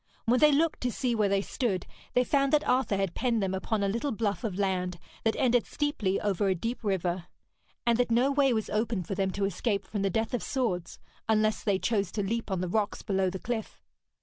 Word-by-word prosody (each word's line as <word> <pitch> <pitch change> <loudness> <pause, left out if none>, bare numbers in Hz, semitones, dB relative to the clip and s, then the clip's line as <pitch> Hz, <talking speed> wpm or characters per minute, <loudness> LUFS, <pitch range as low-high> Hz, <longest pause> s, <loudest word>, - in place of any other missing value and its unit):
When 245 +2 +3
they 300 0 +7
looked 315 +3 +2
to 250 - 0
see 250 +1 -1
where 215 -3 +2
they 195 0 +2
stood, 200 -9 -1 0.3
they 250 - +5
found 275 +1 +2
that 300 - +3
Arthur 250 -5 +2
had 195 -3 -1
penned 235 -5 0
them 190 -1 -1
upon 200 +2 -1
a - - +2
little 235 +8 -1
bluff 215 0 -1
of 200 -5 -2
land 185 -3 0 0.3
that 225 - +2
ended 245 -3 +2
steeply 290 -11 0
over 200 -1 0
a 190 - +2
deep 230 +8 -4
river, 180 -3 -1 0.6
and 235 0 +3
that 245 - +2
no 245 +4 +3
way 275 -1 +3
was 220 -3 0
open 215 -2 0
for 185 - -4
them 195 0 0
to 195 +1 -1
escape 200 +1 -1
from 205 - -3
the 195 - +2
death 225 +4 -1
of 245 - 0
swords, 185 -10 -2 0.3
unless 215 0 +2
they 200 -3 +2
chose 200 -2 0
to 205 - -1
leap 225 +3 -2
on 190 -2 -1
the 185 - -1
rocks 205 +3 -1
below 190 -2 +1
the 190 - -4
cliff. 220 +2 -4
215 Hz, 230 wpm, -29 LUFS, 195-240 Hz, 0.6 s, they